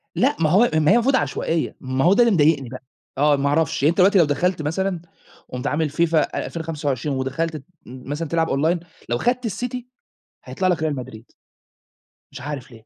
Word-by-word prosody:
لأ، -, -, +2 dB
ما 155 Hz, -2 st, +2 dB
هو 210 Hz, +9 st, +4 dB
ما 155 Hz, 0 st, +3 dB
هي -, -, +6 dB
المفروض 250 Hz, +3 st, +3 dB
عشوائية، 165 Hz, -9 st, -1 dB
ما 130 Hz, +1 st, -1 dB
هو 180 Hz, -, +6 dB
ده 200 Hz, -, 0 dB
اللي 235 Hz, -, +3 dB
مضايقني 145 Hz, -6 st, +2 dB
بقى. 130 Hz, +1 st, -9 dB, 0.3 s
آه، 145 Hz, +1 st, +4 dB
ما 140 Hz, 0 st, 0 dB
أعرفش. 145 Hz, -2 st, 0 dB
يعني 150 Hz, -, +5 dB
أنت 170 Hz, -, -2 dB
دلوقتي 195 Hz, +2 st, +5 dB
لو 170 Hz, -, +6 dB
دخلت 155 Hz, +4 st, 0 dB
مثلًا 175 Hz, +4 st, -2 dB, 0.5 s
قُمت 125 Hz, 0 st, -4 dB
عامل 155 Hz, +1 st, 0 dB
FIFA 165 Hz, 0 st, +1 dB
2025 150 Hz, -4 st, -3 dB
ودخلت 155 Hz, +5 st, -2 dB
ت 140 Hz, -, -12 dB, 0.2 s
مثلًا 135 Hz, +6 st, -6 dB
تلعب 165 Hz, +1 st, 0 dB
online، 165 Hz, +5 st, 0 dB, 0.2 s
لو 120 Hz, -, +1 dB
خدت 245 Hz, -, 0 dB
الCity، 240 Hz, +5 st, -4 dB, 0.7 s
هيطلَع 185 Hz, -2 st, -1 dB
لك 180 Hz, -, +1 dB
Real 150 Hz, -2 st, -1 dB
Madrid. 110 Hz, 0 st, -13 dB, 1.0 s
مش 135 Hz, -, -9 dB
عارف 140 Hz, -2 st, -6 dB
ليه. 115 Hz, -2 st, -15 dB
155 Hz, 190 wpm, -22 LUFS, 140-175 Hz, 1.0 s, هي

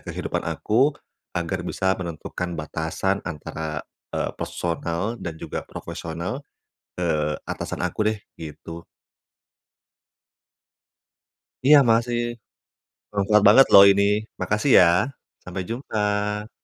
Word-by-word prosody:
kehidupan -, -, -3 dB
aku. 135 Hz, +7 st, +2 dB, 0.4 s
Agar -, -, -2 dB
bisa 95 Hz, 0 st, 0 dB
menentukan 85 Hz, 0 st, -5 dB
batasan 80 Hz, +5 st, -2 dB
antara, 80 Hz, -2 st, -5 dB, 0.2 s
eee, -, -, -2 dB
personal 85 Hz, +6 st, -3 dB
dan 80 Hz, -2 st, -5 dB
juga -, -, -5 dB
profesional 85 Hz, +10 st, -5 dB, 0.6 s
ke 90 Hz, -, -1 dB, 0.4 s
atasan -, -, -4 dB
aku -, -, -5 dB
deh 110 Hz, -, -2 dB, 0.2 s
gitu. 80 Hz, +1 st, -9 dB, 2.8 s
Iya, 145 Hz, +3 st, +8 dB
makasih. 115 Hz, +1 st, +2 dB, 0.9 s
Bermanfaat 105 Hz, +1 st, +3 dB
banget 135 Hz, -, +8 dB
loh 100 Hz, -, +11 dB
ini. 100 Hz, 0 st, +3 dB, 0.4 s
Makasih 105 Hz, +7 st, 0 dB
ya. 90 Hz, -, +8 dB, 0.6 s
Sampai 90 Hz, +1 st, -4 dB
jumpa. 105 Hz, -3 st, -2 dB
95 Hz, 95 wpm, -24 LUFS, 85-110 Hz, 2.8 s, loh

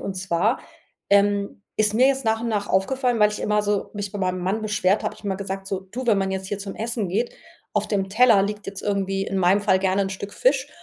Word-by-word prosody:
Und 195 Hz, -, -4 dB
zwar, 185 Hz, +5 st, 0 dB, 0.5 s
ähm, 200 Hz, 0 st, +2 dB
ist 215 Hz, -1 st, +2 dB
mir 255 Hz, +4 st, +5 dB
jetzt 270 Hz, -2 st, 0 dB
nach 225 Hz, 0 st, +1 dB
und 235 Hz, -, -2 dB
nach 205 Hz, -2 st, -1 dB
aufgefallen, 245 Hz, +4 st, +1 dB
weil 210 Hz, 0 st, +6 dB
ich 210 Hz, -, -6 dB
immer 210 Hz, 0 st, +1 dB
so 205 Hz, -1 st, -1 dB
mich 205 Hz, -1 st, -4 dB
bei 205 Hz, -, -6 dB
meinem 185 Hz, -1 st, -1 dB
Mann 195 Hz, +5 st, -1 dB
beschwert 205 Hz, -2 st, +1 dB
habe -, -, -2 dB
ich -, -, -18 dB
immer 195 Hz, -1 st, -1 dB
gesagt: 195 Hz, 0 st, -5 dB
„So, 195 Hz, -1 st, -3 dB
du, 235 Hz, +7 st, -7 dB
wenn 210 Hz, -4 st, +4 dB
man 190 Hz, 0 st, 0 dB
jetzt 190 Hz, 0 st, -3 dB
hier 205 Hz, +1 st, -3 dB
zum 195 Hz, -1 st, -6 dB
Essen 225 Hz, -3 st, -2 dB
geht” 225 Hz, +7 st, -1 dB, 0.4 s
auf -, -, +1 dB
dem 195 Hz, -2 st, -1 dB
Teller 220 Hz, -1 st, +5 dB
liegt 210 Hz, +1 st, -4 dB
jetzt 195 Hz, 0 st, -6 dB
irgendwie 195 Hz, -1 st, -1 dB
in 195 Hz, -, -3 dB
meinem 190 Hz, +2 st, +4 dB
Fall 190 Hz, -2 st, +3 dB
gerne 190 Hz, +1 st, +1 dB
'n 195 Hz, -, -2 dB
Stück 200 Hz, +1 st, -6 dB
Fisch 265 Hz, +2 st, +1 dB
200 Hz, 250 wpm, -23 LUFS, 195-215 Hz, 0.5 s, weil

